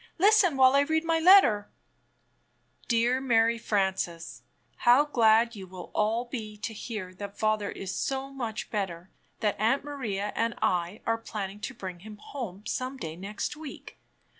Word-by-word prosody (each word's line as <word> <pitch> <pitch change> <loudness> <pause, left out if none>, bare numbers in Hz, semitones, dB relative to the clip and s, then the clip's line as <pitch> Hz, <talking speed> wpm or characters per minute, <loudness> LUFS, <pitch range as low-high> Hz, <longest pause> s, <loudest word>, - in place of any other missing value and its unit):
"Listen 380 -5 +5
while 260 0 +6
I 280 - +5
read 315 +3 +1
my 330 0 +1
letter: 320 - +6 1.2
Dear 240 +2 +2
Mary 230 -2 +3
Frances: 190 -6 -2 0.4
How 250 +4 +5
glad 230 -4 +3
you 190 -2 -8
will 185 0 -10
all 225 +3 0
he 215 -4 -6
to 220 - -5
hear 205 -4 -6
that 200 +2 -8
father 215 -2 0
is 190 -1 -5
so 270 0 -2
much 235 -5 -5
better 190 -4 -4 0.3
that 210 -2 0
Aunt 230 +7 +2
Maria 220 -9 -3
and 230 +1 0
I 180 +3 0
are 225 0 0
planning 205 -3 -6
to 265 +4 -6
bring 185 -2 -7
him 210 +3 -11
home 210 -4 -7
some 255 +1 -3
day 160 -10 -6
next 205 - -4
week. 305 -2 -10
225 Hz, 160 wpm, -28 LUFS, 200-265 Hz, 1.2 s, while